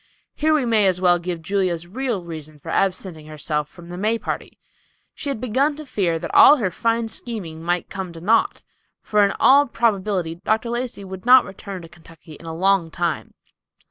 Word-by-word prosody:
Here 310 +1 +1
we 285 -4 +1
may 220 -4 +3
as 185 -1 +1
well 175 -1 +4
give 170 -1 -5
Julia's 180 -2 -1
real 230 0 -3
reason 155 -2 -8
for 155 +3 -11
absenting 180 -5 -1
herself 150 -1 -3
from 175 -1 -14
the 175 +1 -7
May 220 +3 +1
party. - - -5 0.6
She 285 - -5
had 275 - -3
begun 260 +5 +1
to 305 +1 -9
fear 180 -10 0
that 165 0 -6
all 295 - +9
her 200 -8 -1
fine 230 +4 0
scheming 205 -9 -6
might 175 +1 -1
come 190 -2 -5
to 165 - -9
naught; 220 +7 +1 0.4
for 210 -1 +3
in 200 - +3
all 285 +2 +6
probability 200 -7 0
Dr. 225 +2 0
Lacey 240 -4 -4
would 190 +3 -9
not 255 0 +8
return 195 -2 -8
to - - -10
Kentucky 165 -1 -15
in 165 +3 -12
a 160 - -5
long 190 -1 +2
time. 170 -1 -3
190 Hz, 195 wpm, -22 LUFS, 170-230 Hz, 0.6 s, all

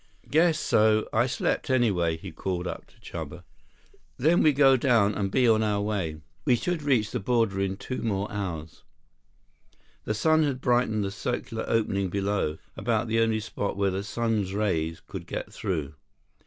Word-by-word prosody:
"Guess 160 +1 +4
so. 110 -3 +3
I 120 +3 +3
slept, 130 - -1
anyway," 95 -11 +2
he - - -9
called 90 -2 -3
up - - -6
to - - -25
Chuba. - - -7 0.7
"Then 160 +6 +3
we 155 - +5
go 135 -1 +5
down, 115 -5 +3
and 100 -1 -1
be 125 +4 +3
on 110 -1 +4
our 105 -2 +1
way. 95 -7 -2 0.2
We 125 - +4
should 175 +6 -2
reach 125 -7 +1
border 115 -4 +1
in 95 0 -1
two 130 - -5
more 100 -2 -1
hours." 85 -6 -5 1.2
The 110 - -1
sun 160 +7 +3
had 140 -4 0
brightened 120 -4 +1
the 100 - -2
circular 115 +1 -3
opening 100 -4 0
below, 100 -5 -1 0.2
about 115 - -1
the 115 0 +2
only 110 -1 +2
spot 100 -2 -4
where 100 -1 +1
the 95 +1 -2
sun's 105 -2 -1
rays 85 -6 -1
could - - -8
get - - -5
through. 80 -6 -3
110 Hz, 170 wpm, -27 LUFS, 95-120 Hz, 1.2 s, we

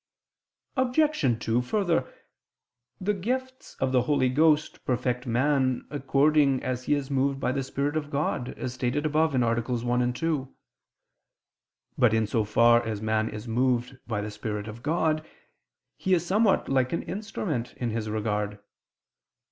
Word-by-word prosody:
Obj. 260 - +2
2: 115 +2 +2
Further, 170 0 0 0.9
the 205 +3 0
gifts 255 +6 -4
of 130 - +1
the 130 -1 +4
Holy 130 0 +2
Ghost 155 +3 +2
perfect 125 0 -1
man 130 +1 +1
according 140 0 +2
as 125 0 -3
he 150 - +3
is 140 -1 -4
moved 135 0 +1
by 125 - 0
the 135 +1 -1
Spirit 140 +3 -2
of 150 -2 -2
God, 140 -3 -2
as 125 - -4
stated 130 +4 -1
above 155 -1 +2
(AA. 120 -2 +2 0.2
1, 125 +1 0
2). 145 -2 -2 1.4
But 115 -3 +5
in 110 0 +2
so 110 +1 0
far 115 +3 +4
as 110 -2 -3
man 110 +1 0
is 105 +2 -7
moved 125 +2 0
by 110 -3 -1
the 105 +1 -5
Spirit 105 0 -4
of 110 +2 -8
God, 155 +1 +1 0.7
he 190 -1 +2
is 170 -1 -1
somewhat 200 +3 +2
like 130 0 +1
an 170 - -1
instrument 185 - -4
in 120 -2 -2
His 110 -1 -3
regard. 105 -1 -2
130 Hz, 150 wpm, -27 LUFS, 120-155 Hz, 1.4 s, But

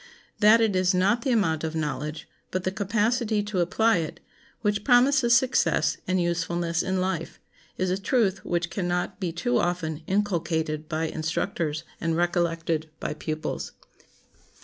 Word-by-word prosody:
That 215 +2 +6
it 215 -4 +2
is 185 0 +2
not 200 +6 +2
the 275 - -1
amount 180 -10 +1
of 160 0 -3
knowledge, 150 0 -3 0.2
but 185 0 -2
the 185 - 0
capacity 215 +2 0
to 205 -2 -2
apply 220 +5 +3
it, 160 -2 -4 0.4
which 210 -1 0
promises 250 -1 +5
success 255 +1 +2
and 185 0 +1
usefulness 170 -1 0
in 190 0 -1
life, 185 +1 -3 0.4
is 185 0 0
a 190 +2 -1
truth 200 -3 +1
which 175 0 -1
can 185 -3 -2
not 180 +3 -2
be 180 -4 -2
too 125 -8 0
often 170 -3 -1
inculcated 160 -6 -1
by 160 -1 -1
instructors 155 0 -2 0.2
and 165 -1 0
recollected 165 -2 0
by - - -3
pupils. 155 0 -4
180 Hz, 150 wpm, -26 LUFS, 160-205 Hz, 0.4 s, That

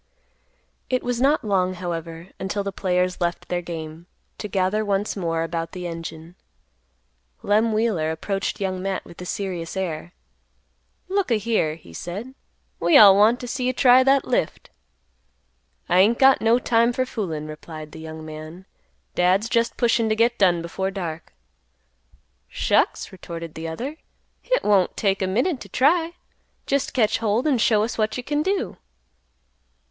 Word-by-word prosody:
It 255 -1 0
was 245 -1 -2
not 285 +3 +3
long, 185 -3 +1
however, 170 -1 -6
until 195 +1 -2
the 200 - -3
players 180 -1 -1
left 175 0 -2
their 180 -1 -1
game, 165 -1 -7 0.3
to 210 - -4
gather 195 +2 0
once 200 0 -1
more 165 -4 -1
about 165 0 -4
the 180 -1 -6
engine. 165 0 -7 1.1
Lem 215 +2 +2
Wheeler 215 -8 +1
approached 195 +5 -3
Young 185 -2 -2
Matt 195 0 -3
with 170 - -12
a 180 - -6
serious 185 -3 -4
air; 170 -3 -3 1.0
"Look 390 -2 0
a 235 - +3
here," 215 -8 0
he 120 - -16
said; 200 - -6 0.5
"we 310 - +5
all 200 -5 +9
want 220 +5 +4
t' - - -5
see 250 +1 -2
you 255 - +1
try 255 0 +6
that 270 +1 +3
lift." 245 -10 -2 1.2
"I 180 - +3
ain't 220 +5 +5
got 270 0 +5
no 225 +2 +4
time 235 -1 +2
for 255 +1 0
foolin'," 170 -11 -4
replied 155 0 -9
the 160 - -10
young 160 0 -8
man; 155 +4 -9 0.5
"Dad's 185 +5 +2
just 230 0 0
pushin' 230 -2 +2
to 215 - +2
get 235 +2 +2
done 175 -4 +3
before 190 +3 -3
dark." 170 -5 -6 1.2
"Shucks!" - - 0
retorted 170 -3 -8
the 160 +1 -6
other; 255 - -5 0.4
"Hit - - 0
won't 200 -3 +2
take 195 -2 +1
a 190 - +1
minute 250 - 0
t' - - -11
try. 325 +5 +2 0.5
Jest 280 -1 -1
catch 220 -4 +2
hold 225 +3 0
an' 280 -6 +2
show 215 -1 +3
us 230 +1 -4
what 215 +2 0
you 250 - -5
can 295 +3 -1
do." 385 +4 -1
195 Hz, 165 wpm, -23 LUFS, 170-235 Hz, 1.2 s, all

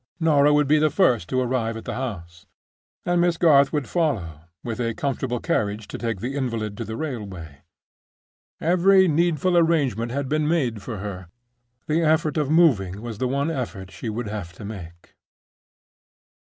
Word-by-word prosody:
Norah 150 -3 +4
would 150 -1 +3
be 150 +2 +4
the 155 0 +3
first 130 - +2
to 130 - 0
arrive 120 -3 -1
at 115 - -9
the - - -4
house; 85 -10 -6 0.6
and 175 0 +2
Miss 175 -1 +2
Garth 140 -5 +5
would 150 -4 -2
follow, 100 - -1 0.2
with 115 0 -4
a 115 -1 -1
comfortable 130 -3 -2
carriage 105 -1 -1
to - - -6
take 115 -5 -3
the 130 +3 -3
invalid 115 -6 -2
to 115 - -3
the 110 +1 -6
railway. 95 - -6 1.0
Every 185 +3 +4
needful 170 +2 +1
arrangement 140 - +2
had 140 +1 -2
been 155 +2 0
made 130 -10 0
for 115 +1 -6
her; 95 -2 -6 0.6
the 155 +2 +1
effort 155 -1 +2
of 150 -3 0
moving 120 - +3
was 115 -3 -6
the 130 - 0
one 140 +5 0
effort 110 - -5
she 115 - -6
would 110 +1 -4
have 100 -5 -6
to 100 - -10
make. 85 -5 -10
130 Hz, 170 wpm, -23 LUFS, 105-155 Hz, 1.0 s, Garth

